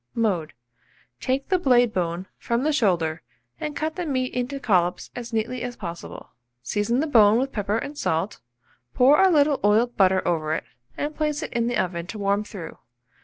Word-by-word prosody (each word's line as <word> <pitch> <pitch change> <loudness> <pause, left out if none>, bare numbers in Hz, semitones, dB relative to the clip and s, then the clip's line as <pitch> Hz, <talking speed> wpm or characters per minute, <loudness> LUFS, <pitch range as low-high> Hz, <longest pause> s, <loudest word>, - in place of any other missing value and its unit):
Mode. 185 -9 0 0.7
Take 265 +1 -1
the 370 -1 +3
blade 245 -6 +4
bone 175 0 -2
from 235 +2 -1
the 310 +1 +1
shoulder, 170 - +1 0.4
and 300 -1 -4
cut 315 +2 -3
the 355 - -2
meat 255 -3 -1
into 250 +3 -2
collops 180 -8 +1
as 240 -1 -6
neatly 230 +2 -2
as 245 0 -4
possible. 170 -5 -8 0.3
Season 210 - 0
the - - +1
bone 220 -7 +5
with 270 +2 -1
pepper 205 -1 -1
and 280 +5 -5
salt, 185 - -1 0.6
pour 270 +4 +6
a 385 - +6
little 295 -4 +3
oiled 225 +4 +3
butter 190 -1 +3
over 155 -2 0
it, - - -3 0.3
and 300 +1 -3
place 300 0 -1
it - - -6
in 235 0 0
the 240 -1 0
oven 175 -3 -2
to 215 - -7
warm 200 0 +1
through. 200 -6 -9
230 Hz, 185 wpm, -24 LUFS, 190-275 Hz, 0.7 s, pour